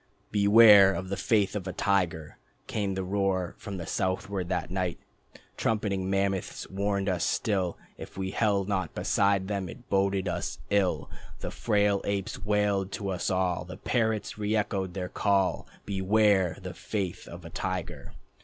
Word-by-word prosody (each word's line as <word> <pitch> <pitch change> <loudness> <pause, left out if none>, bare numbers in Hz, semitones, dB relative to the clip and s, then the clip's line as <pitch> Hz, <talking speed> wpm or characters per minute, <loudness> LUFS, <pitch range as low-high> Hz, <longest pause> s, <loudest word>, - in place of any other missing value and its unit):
"Beware 100 -1 +7
of 95 -1 -5
the 100 - -1
faith 105 -1 +1
of 95 -2 -4
a 95 - -3
tiger," 90 -6 0 0.3
Came 100 -3 -2
the 95 - -2
roar 95 -2 0
from 100 -2 -6
the 85 - -5
southward 95 -1 -2
that 90 -1 -2
night. 90 -2 -1 0.6
Trumpeting 100 -4 0
mammoths 95 -1 -1
warning 100 0 -1
us 90 -3 0
still 95 -5 0 0.2
If - - -10
we 95 0 -2
held 100 -3 +1
not 95 -5 -2
beside 100 -1 +2
them 100 -3 -2
it 125 +5 -12
boded 95 -1 +1
us - - -3
ill. 100 -3 +1 0.3
The - - -4
frail 105 -3 +1
apes 100 0 -3
wailed 105 -2 +1
to 100 - -3
us 90 -2 -1
all, 90 -2 0
The 90 +1 -9
parrots 110 -2 -1
reëchoed 105 -3 -1
the 90 0 -3
call: 95 0 +1 0.2
"Beware 100 -2 +3
of - - -15
the - - -5
faith 95 -5 -4
of - - -10
a - - -9
tiger." - - -4
100 Hz, 160 wpm, -28 LUFS, 95-105 Hz, 0.6 s, Beware